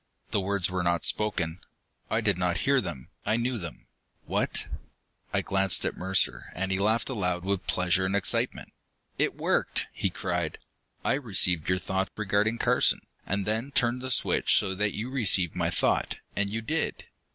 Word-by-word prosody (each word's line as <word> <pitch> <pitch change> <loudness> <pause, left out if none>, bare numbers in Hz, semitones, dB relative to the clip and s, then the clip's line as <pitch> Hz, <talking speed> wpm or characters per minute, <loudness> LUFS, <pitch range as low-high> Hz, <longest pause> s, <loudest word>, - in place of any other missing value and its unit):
The 100 - +1
words 95 -1 0
were 90 0 -2
not 85 -2 0
spoken. 95 -6 0 0.5
I 110 - +1
did 105 -4 +2
not 90 0 0
hear 135 -1 +4
them, 85 - -7
I 110 - +1
knew 120 0 -1
them. 85 -4 -9 0.4
What - - -1 0.7
I - - +1
glanced 95 -2 +2
at - - -1
Mercer, 95 0 0
and 95 +2 -2
he 95 - 0
laughed 110 +3 +1
aloud 90 -8 -2
with 100 0 -2
pleasure 90 +1 +2
and 95 - -1
excitement. 100 - +1 0.5
"It - - +1
worked!" - - +1
he 95 - -1
cried. 90 -3 -3 0.5
"I - - +3
received 95 - +2
your 90 - +3
thought 95 +1 -2
regarding 105 +2 +1
Carson, - - +3 0.3
and 100 +1 -1
then 110 +5 -1
turned 120 +1 +1
the 130 - -4
switch 125 - +4
so 95 -2 0
that 100 +1 -1
you 115 +5 -4
received 95 - +3
my - - 0
thought. - - 0 0.2
And 100 0 +1
you 110 +2 -3
did!" 160 +7 -2
100 Hz, 175 wpm, -27 LUFS, 90-110 Hz, 0.7 s, hear